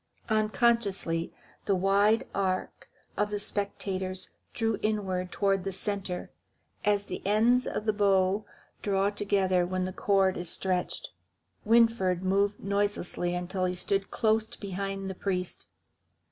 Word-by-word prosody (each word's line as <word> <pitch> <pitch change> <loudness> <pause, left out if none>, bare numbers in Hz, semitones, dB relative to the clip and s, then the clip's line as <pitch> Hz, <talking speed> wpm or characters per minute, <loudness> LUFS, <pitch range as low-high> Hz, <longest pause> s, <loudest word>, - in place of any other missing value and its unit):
Unconsciously 215 -6 +2 0.3
the 200 - +2
wide 200 +4 +3
arc 190 -2 -2 0.3
of 210 0 0
spectators 190 -2 -2 0.2
drew 225 -2 -1
inward 190 -4 -1
toward 195 -2 +1
the 195 - -2
centre, 190 -1 -3 0.5
as 205 -1 +2
the - - -6
ends 230 +5 +3
of 215 - -3
the 215 - +2
bow 200 0 +3 0.4
draw 200 0 +1
together 195 -3 +2
when 185 +1 -1
the 185 - -4
cord 195 -1 +2
is 175 -1 -2
stretched. 185 0 -1 0.6
Winfried 225 -5 +3
moved 200 +2 +1
noiselessly 200 -3 -1
until 185 +1 -2
he 180 0 -1
stood 195 +2 -1
close 220 0 +1
behind 195 -1 -5
the 190 - -3
priest. 180 -1 -3
195 Hz, 125 wpm, -29 LUFS, 185-210 Hz, 0.6 s, wide